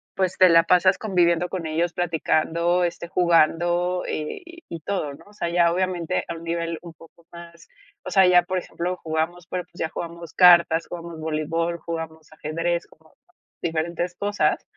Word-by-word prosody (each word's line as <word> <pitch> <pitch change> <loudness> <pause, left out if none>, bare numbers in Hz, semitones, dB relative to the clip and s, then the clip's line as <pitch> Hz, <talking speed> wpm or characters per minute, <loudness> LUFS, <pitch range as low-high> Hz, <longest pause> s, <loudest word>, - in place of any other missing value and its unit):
pues, 185 -1 -1
te 185 -1 +8
la 165 0 +6
pasas 180 +2 +4
conviviendo 175 -4 +1
con 180 -3 -4
ellos, 165 +2 -1
platicando, 170 +1 +1
este, 170 0 -3
jugando, 175 +1 +2
y 340 - -6
y 165 - -6
todo, 160 -5 -3
¿no? - - -15
O 205 - -18
sea, 170 -4 -3
ya 170 -1 +3
obviamente 180 -1 -1
a - - -4
un 165 - -10
nivel 170 0 -3
un 170 -2 -11
poco 165 +1 -19
más 170 0 -13 0.4
o - - -4
sea, 190 -1 +6
ya 180 -1 +6
por 185 +1 -3
ejemplo, 180 0 -4
jugamos, 160 +2 -2
pero, 180 -2 -4
pues, 175 - -19
ya 160 - -1
jugamos 170 -1 -7
cartas, 170 -2 +6
jugamos 170 -1 -8
voleibol, 160 +2 -2
jugamos 160 -1 -7
ajedrez, 165 +3 -2
como 160 0 -24 0.5
diferentes 170 +2 -2
cosas 205 0 0
170 Hz, 170 wpm, -23 LUFS, 165-180 Hz, 0.5 s, te